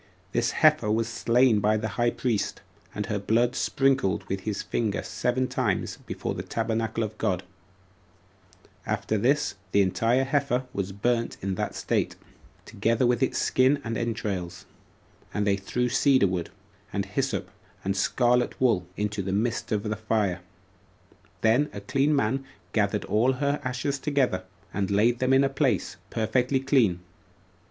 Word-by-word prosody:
This - - +1
heifer 105 - +3
was 110 +1 +1
slain 120 0 +3
by 105 +1 +2
the 110 0 -2
high 120 +4 +1
priest, 120 -3 -2 0.3
and 105 - -2
her 105 -3 -2
blood 120 +5 +1
sprinkled 135 -8 +1
with 95 0 -3
his 100 0 -3
finger 110 -3 -1
seven 130 +1 -1
times - - -1
before - - -3
the - - -4
tabernacle 115 0 -1
of 110 0 -5
God; 95 -4 0 1.4
after 110 - -1
this, 135 +8 +2 0.2
the 100 - +5
entire 115 +7 +2
heifer 135 -2 0
was 100 -1 -2
burnt 115 +4 -1
in 95 0 -1
that - - -3
state, - - -1 0.5
together 115 +4 +1
with 120 0 +2
its 130 - +1
skin 130 +3 +3
and 115 0 -3
entrails; 105 -7 -3 0.7
and 105 - +1
they 100 -1 +3
threw 120 +5 -1
cedar 130 -1 +4
wood, 90 -2 -2 0.4
and - - -1
hyssop, - - -2 0.3
and 95 0 -1
scarlet 120 +4 +2
wool, 110 -9 +2
into 105 0 -1
the 95 0 -3
midst 115 +5 -1
of 105 -2 0
the 110 -1 -2
fire; 105 -4 0 1.0
then 120 +7 +3
a - - -5
clean 135 +7 +1
man 135 +1 +1 0.3
gathered 105 -1 +1
all 120 +5 +2
her 140 +2 -1
ashes 130 +2 -2
together, 130 -11 0 0.3
and 100 -1 -1
laid 115 +4 +3
them 130 0 +1
in 135 +1 +5
a - - +4
place 135 -8 0
perfectly 125 +5 +1
clean. 125 -10 +2
115 Hz, 155 wpm, -26 LUFS, 100-130 Hz, 1.4 s, the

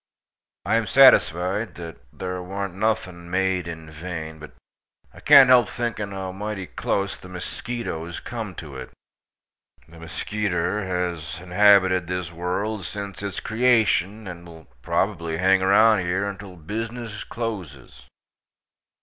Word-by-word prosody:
I - - +2
am - - -1
satisfied 95 +6 +4
that 85 -2 -8 0.2
thare 90 -1 -4
want 95 +1 -4
nothing 95 -4 -2
made 90 -1 0
in 80 -1 -7
vain, 80 0 -7
but 80 - -11 0.6
i - - -14
kant 140 -3 +8
help 125 -1 +6
thinking 115 -4 -3
how 95 -1 -5
mighty 100 0 -5
kluss 100 +2 -2
the - - -13
musketoze 90 -2 -5
kum 110 -6 -6
to 70 -5 -9
it. 65 - -8 1.0
The 85 +1 -16
muskeeter 95 +3 -2
haz 85 -3 -3
inhabited 95 -1 +4
this 90 -2 -3
world 90 +5 -3
since 100 +1 -6
its 100 -3 -4
kreashun, 110 -3 +2
and 85 -1 -9
will 80 -1 -13 0.2
probably 80 +5 -1
hang 95 +2 +4
around 105 +3 +5
here 95 +3 -1
until 95 -2 -8
bizzness 110 +5 -5
closes. 95 - -7
95 Hz, 130 wpm, -24 LUFS, 85-105 Hz, 1.0 s, kant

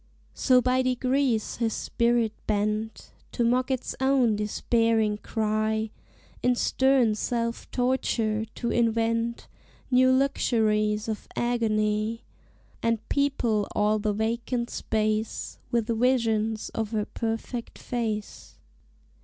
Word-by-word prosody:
So 255 -2 +3
by 255 +1 +2
degrees 255 -2 0
his 230 -2 0
spirit 235 -2 +1
bent 215 +1 -1 0.2
To 240 - 0
mock 250 +2 +2
its 260 -2 -2
own 265 -4 +3
despairing 215 0 +1
cry, 220 0 -1 0.5
In 250 0 +3
stern 260 -2 +3
self 230 +2 -2
torture 235 -4 0
to 235 - -2
invent 230 0 0 0.4
New 255 +1 +5
luxuries 215 -5 +1
of 220 -2 -4
agony, 220 -1 0 0.6
And 230 -1 0
people 245 -7 +1
all 210 +1 +2
the 210 0 0
vacant 235 +3 -2
space 215 0 -2
With 235 -3 +1
visions 225 -2 +1
of 220 -2 -3
her 210 -1 0
perfect 230 +1 -4
face. 220 -4 -4
230 Hz, 105 wpm, -26 LUFS, 215-245 Hz, 0.6 s, New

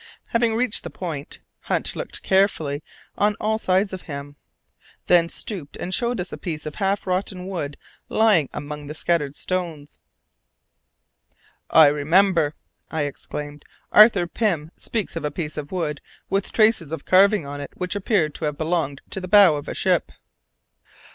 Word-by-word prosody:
Having 230 -1 +2
reached 230 -2 0
the - - -6
point, 155 -6 -6 0.2
Hunt - - -2
looked - - -6
carefully 165 -7 +2 0.4
on 210 0 +3
all 220 +1 0
sides 190 0 +1
of 185 - -5
him, 145 -1 -8 0.7
then 170 -1 +4
stooped 170 -9 -7
and 185 - -4
showed 240 +2 0
us 180 - -4
a - - -6
piece 160 -5 -5
of 155 - -5
half 195 +2 -1
rotten 185 0 -2
wood 155 -7 -4 0.3
lying 205 -11 +3
among 150 0 -6
the 150 - -6
scattered 150 -4 0
stones. 170 -6 -4 1.7
"I 160 - +8
remember!" 155 +2 +3 0.3
I 160 -2 -1
exclaimed; 145 +1 -6 0.3
"Arthur 210 -4 +7
Pym 170 -5 -1
speaks 220 -7 -3
of 165 - -4
a 150 - 0
piece 150 +1 -5
of 145 -1 -6
wood 160 -6 -2 0.3
with 195 0 0
traces 215 -9 +3
of 160 -3 -5
carving 195 -2 +5
on 145 0 -6
it 140 - -6
which 180 +2 -3
appeared 190 -7 +1
to 160 - -4
have 150 -1 -2
belonged 160 -4 -1
to 190 - -3
the 185 - -5
bow 195 -4 +7
of 145 - -6
a - - -4
ship." - - +1
170 Hz, 160 wpm, -23 LUFS, 150-195 Hz, 1.7 s, I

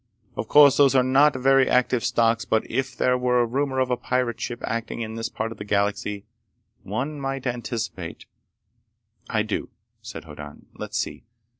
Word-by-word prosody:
Of 110 - -4
course 145 0 +7
those 140 -2 +5
are 130 - +5
not 135 +3 +4
very 135 +1 +4
active 125 -1 +2
stocks, 115 0 +2
but 110 - 0
if 130 +2 -3
there 125 0 +2
were 125 0 +2
a 120 - +3
rumor 130 +2 -1
of 130 -1 +1
a - - +3
pirate 125 -2 -1
ship 120 - -4
acting 115 +1 -3
in 110 -1 -4
this 115 0 -4
part 110 +1 -4
of - - -10
the - - -4
galaxy, 100 0 -1 0.6
one 135 +9 -4
might 135 -1 -3
anticipate—" 115 -8 -4 1.0
"I - - +1
do," - - -3 0.3
said - - -8
Hoddan. 75 -2 -11
"Let's - - -5
see. - - -3
125 Hz, 175 wpm, -24 LUFS, 110-130 Hz, 1.0 s, course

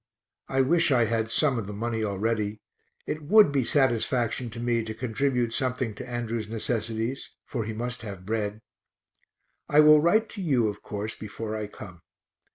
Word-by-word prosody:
(I 135 - +2
wish 165 +3 +3
I 120 -3 +4
had 115 0 -1
some 135 0 +2
of 105 - -5
the 105 - -6
money 115 +1 -2
already; 105 +1 -1 0.5
it 155 - -3
would 200 +2 +6
be 140 -2 +1
satisfaction 120 -2 +1
to 115 +1 -8
me 120 -1 0
to 110 0 -6
contribute 125 0 0
something 125 -3 -1
to 120 +4 -9
Andrew's 115 -2 -3
necessities, 115 +2 -3
for 115 -5 -3
he 110 - -4
must 120 +2 -4
have 100 -4 -8
bread.) 105 0 -2 1.1
I 150 +1 +6
will 150 0 +7
write 215 +8 +3
to 205 - -7
you, 130 - +2
of 105 0 -7
course, 105 +1 -4
before 110 +1 -6
I 105 -1 -3
come. 90 -4 -11
115 Hz, 170 wpm, -27 LUFS, 110-130 Hz, 1.1 s, will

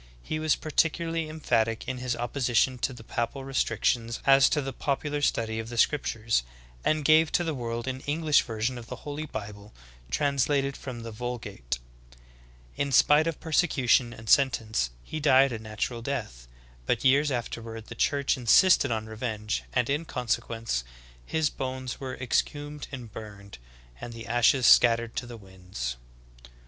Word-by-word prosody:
He 155 - -3
was 155 -1 +2
particularly 165 +1 0
em 155 +1 -8
phatic 115 -5 +1
in 130 -1 -3
his 125 -1 -2
opposition 125 +1 +1
to 130 - 0
the 120 -3 -11
papal 120 +4 -3
restrictions 115 -2 0
as 135 0 +6
to 150 - +1
the 135 -2 -4
popular 145 +1 -2
study 110 -5 0
of 115 0 -5
the 120 - -7
scriptures, 115 - +1 0.4
and 155 -1 +1
gave 160 +1 +5
to 175 - +3
the 165 -2 -2
world 120 -2 -4
an 130 0 -3
English 150 0 +3
version 115 +2 -3
of 115 - -11
the 125 - -6
Holy 150 +1 -4
Bible 105 -3 -8 0.3
translated 140 - +1
from 125 -3 -7
the 115 - -6
Vul 120 +3 -4
gate. 80 - -5 1.0
In 140 0 -1
spite 150 +4 +5
of 165 - -3
persecution 135 -7 +2
and 110 -1 -11
sentence, 115 - +2
he 155 - -5
died 135 -2 +5
a 115 - -4
natural 110 +2 -4
death; 110 - -5 0.4
but - - 0
years 140 +3 +5
afterward 115 -3 -5
the - - -9
Church 140 -1 +1
insisted 140 - +5
on 110 -2 -2
revenge, 110 -1 -3
and 125 -2 +1
in 145 +4 -1
consequence, 115 - -2 0.4
his 160 -2 +1
bones 130 -1 -5
were 130 -2 -5
exhumed 145 +4 -2
and 125 -5 -8
burned, 100 - -10 0.4
and 120 - -7
the 115 0 -8
ashes 120 +2 +3
scattered 115 -1 +5
to 120 - -3
the 120 -1 -9
winds. 90 - -6
125 Hz, 160 wpm, -27 LUFS, 115-140 Hz, 1.0 s, as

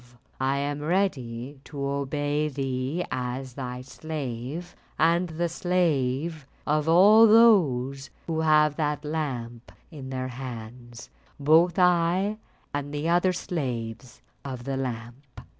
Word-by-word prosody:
I 135 +1 +1
am 145 +1 -2
ready 145 -7 -1
to 145 - -9
obey 145 +2 -1
thee 135 +4 -2
as 125 +1 -4
thy 125 -1 -5
slave, 140 +2 -6 0.2
and 170 +2 +3
the 170 +2 -1
slave 160 -4 0 0.2
of 150 +1 +1
all 210 +7 +7
those 140 - +4 0.2
who 160 -1 -2
have 150 -2 +3
that 150 -1 -1
lamp 125 -7 -4 0.2
in 140 -5 -8
their 130 -1 -3
hands, 120 -1 -9 0.3
both 160 +4 +4
I 180 +3 +2 0.3
and 145 0 -3
the 150 +2 -2
other 175 +2 +3
slaves 125 -8 -5 0.2
of 130 -3 -6
the 135 +1 -3
lamp." 125 +1 -6
145 Hz, 120 wpm, -26 LUFS, 130-165 Hz, 0.3 s, all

